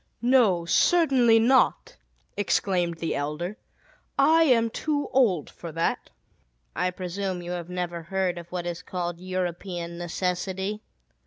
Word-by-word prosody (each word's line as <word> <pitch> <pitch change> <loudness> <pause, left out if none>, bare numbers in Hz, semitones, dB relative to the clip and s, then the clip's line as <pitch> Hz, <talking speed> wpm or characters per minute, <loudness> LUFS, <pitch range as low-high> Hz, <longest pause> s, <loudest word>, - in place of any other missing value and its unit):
"No, 235 -9 +3
certainly 260 - +4
not!" 245 +4 +3 0.4
exclaimed 180 -4 0
the 165 - -2
elder. 150 +8 -3 0.6
"I 320 +4 +5
am 230 -5 +3
too 290 +2 -1
old 210 - +3
for 170 - -9
that." 165 +1 -1 0.7
"I 180 +2 +1
presume 185 0 -4
you 175 - -5
have 175 -1 -5
never 175 -1 -3
heard 185 0 -1
of 170 0 -12
what 180 -1 -3
is 175 0 -4
called 175 -2 -4
'European 175 -1 -4
necessity?'" 185 +4 -2
180 Hz, 130 wpm, -26 LUFS, 175-225 Hz, 0.7 s, I